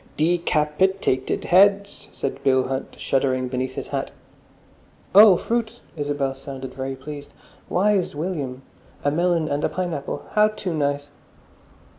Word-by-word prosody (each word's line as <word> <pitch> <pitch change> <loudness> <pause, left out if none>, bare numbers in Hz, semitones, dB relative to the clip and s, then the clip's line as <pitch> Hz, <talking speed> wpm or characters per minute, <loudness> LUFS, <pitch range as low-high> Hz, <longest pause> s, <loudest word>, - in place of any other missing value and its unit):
"De 170 +3 +2
cap 150 -1 -1
it 190 +1 +2
ated 130 0 0
heads!" 200 +2 +3
said 135 0 -4
Bill 130 -1 +3
Hunt, 135 0 -5
shuddering 130 -1 0
beneath 130 0 -3
his - - -6
hat. - - -2 1.0
"Oh, 200 -2 +9
fruit!" 235 +2 -2 0.2
Isabel 145 -3 -1
sounded 135 -1 -8
very 135 0 -4
pleased. 145 +2 -9 0.4
"Wise 195 -3 +1
William! 145 -6 -4 0.4
A 145 - +2
melon 170 0 +1
and 145 0 -2
a - - +2
pineapple. 155 -6 -4
How 210 0 +5
too 205 -4 -4
nice!" 145 -1 -1
150 Hz, 140 wpm, -23 LUFS, 135-185 Hz, 1.0 s, Oh